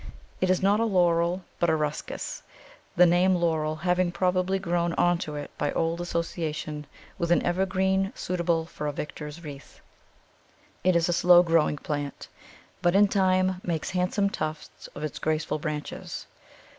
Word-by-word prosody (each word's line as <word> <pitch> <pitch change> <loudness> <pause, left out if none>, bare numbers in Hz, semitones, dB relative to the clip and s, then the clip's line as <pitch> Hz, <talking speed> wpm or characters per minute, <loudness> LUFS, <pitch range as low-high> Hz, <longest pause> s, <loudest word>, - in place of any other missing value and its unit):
It 185 - +2
is 185 0 +2
not 200 +2 +4
a - - +2
laurel, 175 -3 +2 0.2
but 170 - +2
a 160 - +3
Ruscus, 150 -1 -3 0.5
the 180 - +7
name 180 +2 +4
laurel 160 -3 0
having 180 +2 +1
probably 185 +1 +1
grown 175 -2 0
on 175 0 +2
to 150 -2 -5
it 145 -1 -6
by 145 - 0
old 165 +1 0
association 155 -3 -3 0.3
with 170 0 -1
any 175 - +3
evergreen 190 +2 +1
suitable 170 -2 -1
for 150 -2 -6
a - - 0
victor's 150 +2 -7
wreath. 145 -2 -10 1.0
It 185 0 +3
is 170 -1 +3
a 175 - +1
slow 175 +1 +6
growing 165 -3 +2
plant, 145 -1 -5 0.5
but 175 +1 +2
in 205 0 +6
time 185 -1 +2
makes 170 +1 -2
handsome 190 +2 +1
tufts 155 -4 -5
of 150 - -6
its 155 - -4
graceful 155 0 -1
branches. 150 -1 -5
175 Hz, 155 wpm, -27 LUFS, 155-185 Hz, 1.0 s, the